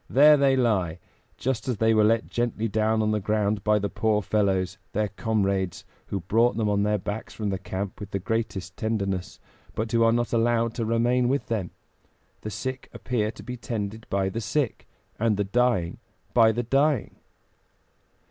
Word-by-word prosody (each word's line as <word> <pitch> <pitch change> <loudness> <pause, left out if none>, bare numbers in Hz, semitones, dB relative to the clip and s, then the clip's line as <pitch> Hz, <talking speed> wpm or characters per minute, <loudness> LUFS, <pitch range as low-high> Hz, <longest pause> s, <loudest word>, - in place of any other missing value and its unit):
There 150 +3 +7
they 140 -2 +3
lie, 100 -10 +1 0.4
just 130 -3 -2
as 125 -4 -1
they 110 +2 +3
were 110 -1 +4
let 110 +1 +3
gently 120 -2 -1
down 110 +1 +1
on 110 - +1
the 105 - +1
ground 105 0 0
by 105 +1 +3
the 100 -1 -1
poor 105 0 0
fellows, 95 -2 0
their 105 0 0
comrades, 100 -4 -1 0.2
who 100 - -3
brought 115 +5 +2
them 110 -2 +1
on 100 -1 +2
their 105 +1 +2
backs 105 +3 -5
from 105 -2 -2
the 95 - -2
camp 95 +1 -5
with 105 - -7
the 100 - -2
greatest 100 -3 -3
tenderness, 100 -5 -2 0.4
but 110 +1 -2
who 115 -1 +2
are 115 - +5
not 120 0 0
allowed 115 0 +2
to 115 - -2
remain 120 +2 +2
with 140 +2 0
them. 105 -7 -1 0.7
The 110 - -5
sick 130 +4 -5
appear 110 -4 -1
to 105 -2 -10
be 125 +3 -6
tended 110 -2 -5
by 95 -1 +1
the 115 +5 -4
sick, 140 +1 -2 0.3
and 110 -2 +2
the 105 - +1
dying 100 -4 +1 0.3
by 115 -2 +6
the 120 +2 -2
dying." 135 +1 +1
110 Hz, 185 wpm, -26 LUFS, 100-115 Hz, 0.7 s, There